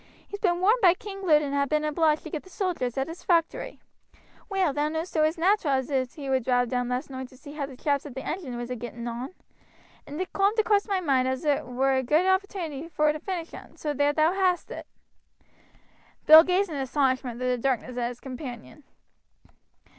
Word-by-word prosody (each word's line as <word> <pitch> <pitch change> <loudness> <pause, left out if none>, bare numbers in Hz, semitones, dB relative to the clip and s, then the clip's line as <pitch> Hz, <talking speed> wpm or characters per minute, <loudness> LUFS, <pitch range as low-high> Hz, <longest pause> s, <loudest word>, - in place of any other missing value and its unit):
He's 405 - -7
been 355 -3 +1
warned 430 +6 +4
by 360 -3 +6
King 390 0 -8
Lud 305 -5 +4
and 280 -1 -3
ha' 280 -1 +1
been 305 0 +1
obliged 305 0 +1
to 315 - -8
get 310 - -3
the 375 - -17
sojers 350 - -2
at 270 +1 0
his 330 +2 -8
factory. 335 -2 0 0.7
Well, 380 -7 +1
thou 295 +2 0
knowest 320 +3 -4
it 310 - +3
was 310 +3 +2
nateral 340 -5 +2
as 260 -1 -1
he 285 -3 -7
would 260 -2 +1
drive 245 0 +1
down 245 0 -1
last 250 +3 -3
noight 260 0 -6
to 255 - -17
see 285 +2 -11
how 290 -2 -4
t' 270 - -11
chaps 285 +2 -1
at 260 - -11
t' 265 - -4
engine 275 -10 -4
was 240 +1 -5
a - - -2
getting 235 0 -7
on, 245 +8 -5 0.7
and 295 +3 -7
it 370 - -4
coomed 400 +3 +2
across 420 -1 +2
my 390 -3 0
moind 265 -6 +2
as 260 +3 -2
it 290 -2 +1
wer 265 +2 +1
a - - +2
good 300 +8 +2
opportunity 375 -6 -1
vor 305 -2 +1
to 305 - -6
finish 345 -1 -5
un; - - -12
so 300 -1 -2
ther 290 +1 +2
thou 310 +3 +2
hast 370 -2 0
it." - - -7 1.4
Bill 315 +1 +11
gazed 365 +1 +1
in 295 - -4
astonishment 260 -3 0
through 250 0 0
the 240 - -8
darkness 255 -1 -1
at 240 -1 -1
his 245 0 -7
companion. 255 +1 -9
295 Hz, 220 wpm, -26 LUFS, 260-350 Hz, 1.4 s, Bill